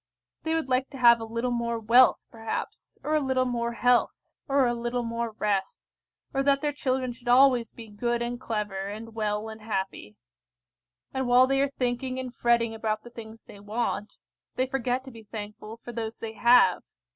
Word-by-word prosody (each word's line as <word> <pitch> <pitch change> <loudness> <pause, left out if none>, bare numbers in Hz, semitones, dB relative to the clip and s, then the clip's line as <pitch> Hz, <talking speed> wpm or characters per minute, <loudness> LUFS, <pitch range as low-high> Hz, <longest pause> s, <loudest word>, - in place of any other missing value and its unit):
They 320 0 -1
would 320 -4 -1
like 255 +1 +1
to 275 - -10
have 235 -2 +6
a 225 - -5
little 230 +2 -2
more 235 -1 -1
wealth, 235 +3 +5
perhaps, 225 -1 -6
or 305 - -1
a 310 - +4
little 260 -2 +1
more 235 -1 -2
health, 245 +1 +1 0.2
or 275 -1 +3
a 240 - +1
little 240 +1 -2
more 230 -1 -3
rest, 200 -2 -2 0.5
or 270 - +1
that 275 0 +3
their 295 0 -1
children 260 -3 -1
should 240 0 -17
always 250 -2 +5
be 230 -2 -11
good 235 +3 -2
and 240 +1 -4
clever, 205 -5 -3
and 220 +3 -7
well 210 -1 -2
and 220 0 -9
happy. 210 0 -4 1.0
And 265 -1 -1
while 250 +1 +6
they 270 +1 +1
are 280 - +2
thinking 255 0 -2
and 255 -2 -5
fretting 235 -1 +2
about 220 -1 -2
the 240 - -12
things 225 -1 -11
they 205 - -13
want, 210 0 -3 0.4
they 255 - +1
forget 260 0 -2
to 265 - -9
be 230 -2 -12
thankful 215 +1 -8
for 240 - -9
those 225 -1 -4
they 225 -1 -6
have. 240 +2 +5
235 Hz, 190 wpm, -27 LUFS, 220-255 Hz, 1.0 s, have